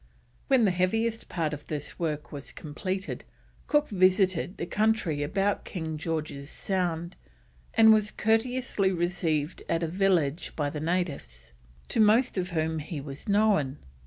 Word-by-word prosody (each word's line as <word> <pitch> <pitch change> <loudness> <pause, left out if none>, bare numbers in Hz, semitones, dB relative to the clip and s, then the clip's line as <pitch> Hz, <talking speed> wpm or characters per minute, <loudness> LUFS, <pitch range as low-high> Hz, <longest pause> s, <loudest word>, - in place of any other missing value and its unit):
When 260 -4 +4
the 195 - +3
heaviest 225 +6 0
part 160 -3 -1
of 150 0 -8
this 150 -2 -5
work 155 -3 -3
was 140 -2 -7
completed 185 +6 -4 0.4
Cook 295 0 +3
visited 185 -1 +2
the - - -3
country 210 -7 +1
about 195 +7 0
King 160 -3 -5
George's 155 -3 -4
Sound, 175 -2 -2 0.6
and 220 -1 +8
was 215 -1 +3
courteously 225 -3 +1
received 170 -3 -1
at 165 0 +1
a - - +1
village 175 -3 +1
by 145 -2 -1
the 150 - -4
natives, 145 - -3 0.4
to - - 0
most 225 +4 +4
of 185 -2 -1
whom 160 -2 -1
he 155 +1 -5
was 140 +5 -7
known. 200 -10 +3
175 Hz, 145 wpm, -28 LUFS, 155-205 Hz, 0.6 s, and